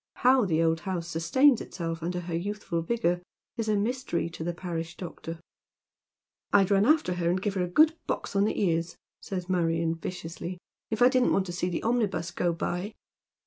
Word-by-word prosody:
How 255 -2 +4
the 165 -3 +2
old 165 0 +2
house 175 -1 -3
sustains 215 - +3
itself 165 -2 -5
under 180 +2 -2
her 175 -1 -6
youthful 190 -1 -2
vigour 175 -2 0 0.3
is 225 -3 -2
a 215 - +3
mystery 210 -5 -1
to 160 - -6
the 175 - -1
parish 170 -1 -5
doctor. 165 -2 -7 0.6
" - - -61
I'd 195 -1 +4
run 200 +2 +4
after 300 - +3
her 175 -1 0
and 180 +2 +1
give 200 +1 -1
her 185 -2 0
a - - -1
good 310 - +5
box - - -3
on 200 +1 +4
the - - -1
ears," 170 -3 0 0.3
saya 185 -2 -4
Marion, 165 -2 +1
viciously, 170 +1 -6 0.2
" - - -65
if 220 +2 +2
I - - +9
didn't 255 -1 +3
want 195 - +2
to 175 - -5
see 175 +1 -1
the 175 - -3
omnibus 215 -7 0
go 175 0 0
by." 180 +4 -3
180 Hz, 200 wpm, -28 LUFS, 170-210 Hz, 0.6 s, I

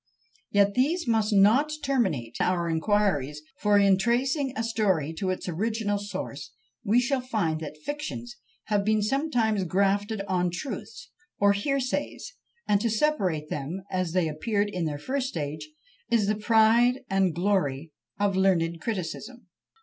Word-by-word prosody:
Yet 200 0 +3
these 300 - +1
must 220 -2 +2
not 215 +10 +4
terminate 190 - 0
our 175 -2 +1
inquiries; 160 -5 0 0.2
for 210 -1 +3
in 195 -1 +4
tracing 260 +6 +1
a 225 - 0
story 190 -9 0
to 190 - -1
its 185 - -3
original 205 +3 -1
source 185 -9 -6 0.3
we 220 +4 +3
shall 260 +1 0
find 210 -11 -1
that 155 -1 -7
fictions 140 - -6 0.3
have 205 -2 0
been 215 0 +2
sometimes 230 -5 +1
grafted 200 +4 0
on 180 -1 +1
truths 220 - -7 0.3
or 200 0 +4
hearsays, 275 - -2 0.3
and 205 -1 +3
to 230 - +1
separate 195 - 0
them 155 +7 -4
as 185 -3 -1
they 180 -3 +2
appeared 205 +7 -1
in 180 -3 -2
their 150 -2 -2
first 260 - -2
stage 155 - -5 0.4
is 230 -3 +3
the 210 - +2
pride 225 +4 +4
and 195 -3 +1
glory 165 -6 0 0.3
of 200 -1 +1
learned 170 -3 +2
criticism. 215 +2 -5
205 Hz, 145 wpm, -27 LUFS, 175-230 Hz, 0.4 s, not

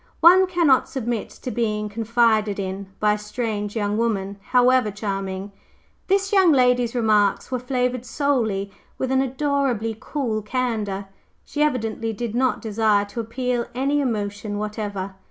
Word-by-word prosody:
One 365 +3 +7
cannot 335 -7 +3
submit 240 -4 -3
to 250 - -7
being 210 -3 -1
'confided 220 -1 +1
in' 190 0 -4
by 210 0 +3
a - - -1
strange 210 -1 -3
young 205 -1 0
woman, 200 -4 -1
however 250 -2 +4
charming. 195 -1 -4 0.6
This 395 +1 +1
young 380 -4 +6
lady's 250 -3 +3
remarks 215 -2 +2
were 255 - 0
flavored 250 -1 -1
solely 225 -7 0 0.3
with 260 - -2
an 265 0 +3
adorably 265 -4 0
cool 235 -7 -2
candor. 215 -4 -2 0.4
She 295 - -4
evidently 225 -6 0
did 225 +1 -4
not 255 +1 +1
desire 215 -2 +2
to 205 +3 -7
appeal 240 +1 -2
to - - -21
any 280 +3 +1
emotion 205 -4 -2
whatever." 205 -2 -4
230 Hz, 145 wpm, -23 LUFS, 210-255 Hz, 0.6 s, One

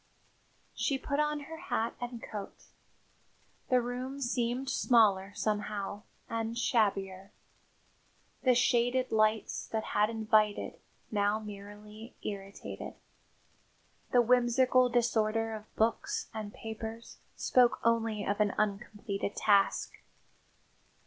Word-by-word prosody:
She 275 - 0
put 280 +2 -2
on 300 0 +1
her 320 +3 -8
hat 230 -7 -2
and 240 -1 -5
coat. 205 -3 -7 1.1
The 255 - +5
room 255 +3 -4
seemed 245 0 -1
smaller 205 -7 +3
somehow 205 -1 -2 0.3
and 230 0 -3
shabbier. 195 -5 0 1.1
The 255 -2 +4
shaded 245 +1 +2
lights 215 0 +1
that 220 -1 -2
had 210 +1 +3
invited, 215 -2 +1 0.3
now 205 0 +2
merely 210 +2 -10
irritated; 195 -1 -6 1.2
the 245 -1 +5
whimsical 250 +1 +4
disorder 225 -2 +1
of 215 0 -9
books 400 - 0
and 215 -2 -5
papers 225 +1 -7 0.2
spoke 250 -2 +3
only 225 -2 +1
of 205 +1 -1
an 210 -2 +2
uncompleted 205 -1 -2
task. 200 -2 +2
225 Hz, 105 wpm, -31 LUFS, 210-245 Hz, 1.2 s, The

